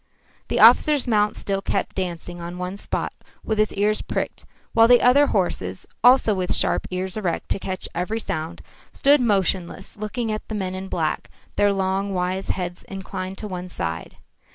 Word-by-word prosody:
The - - -1
officer's 295 -4 +6
mount 210 -2 +2
still 195 -1 -2
kept - - -2
dancing 175 -1 -4
on 175 +1 -6
one 180 +1 -4
spot 200 - -3 0.3
with 220 -1 -1
his 215 - +3
ears 210 +2 +1
pricked, - - -4 0.3
while 225 0 +6
the 245 0 +7
other 280 +4 +5
horses, 95 - -1 0.2
also 245 -3 +6
with 185 -2 0
sharp - - +1
ears 185 +2 -3
erect 185 -6 -2
to - - 0
catch 185 -1 -3
every 185 +6 -2
sound, 170 -5 -4 0.3
stood 285 0 +4
motionless 190 -4 0
looking 215 +2 -3
at 215 - -4
the 220 - -4
men 190 -3 -2
in 190 +1 -5
black, 160 -4 -2 0.3
their 205 0 +3
long 195 0 -1
wise 185 +1 -1
heads 175 -1 -3
inclined 190 0 -6
to 215 - -5
one 180 -2 -6
side. 80 - -4
195 Hz, 175 wpm, -23 LUFS, 180-215 Hz, 0.3 s, the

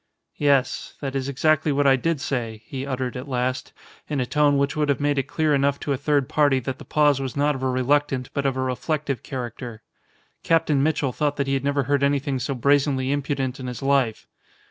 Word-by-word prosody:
"Yes, 140 -3 +1
that 135 -2 -4
is 135 0 -2
exactly 155 +2 +2
what 145 0 +1
I 135 -1 +6
did 165 +3 -1
say," 115 -6 -3
he 135 -2 -5
uttered 130 -2 -3
at 125 +3 -6
last, 130 -1 -2 0.4
in 145 -2 -1
a 125 - 0
tone 145 +2 +3
which 140 0 0
would 150 -1 0
have 140 - +1
made 145 -1 +1
it 135 - -2
clear 150 +2 +1
enough 140 0 +2
to 145 - -1
a - - +1
third 145 -1 +1
party 145 -3 +3
that 130 +2 -5
the - - -10
pause 145 -2 +3
was 135 0 -4
not 145 +1 +2
of 135 - -6
a 130 - 0
reluctant 130 0 0
but 140 -1 0
of 135 -1 -1
a - - 0
reflective 140 +2 -2
character. 120 -3 -6 0.6
Captain 160 -4 +2
Mitchell 145 -3 0
thought 145 -1 0
that 140 - -1
he 135 - -1
had 135 -1 0
never 140 0 +1
heard 140 +1 +1
anything 140 -1 +1
so 140 +2 -2
brazenly 135 0 +2
impudent 140 -2 -2
in 130 - -5
his 125 +2 -6
life. 135 -5 +1
140 Hz, 220 wpm, -23 LUFS, 130-145 Hz, 0.6 s, I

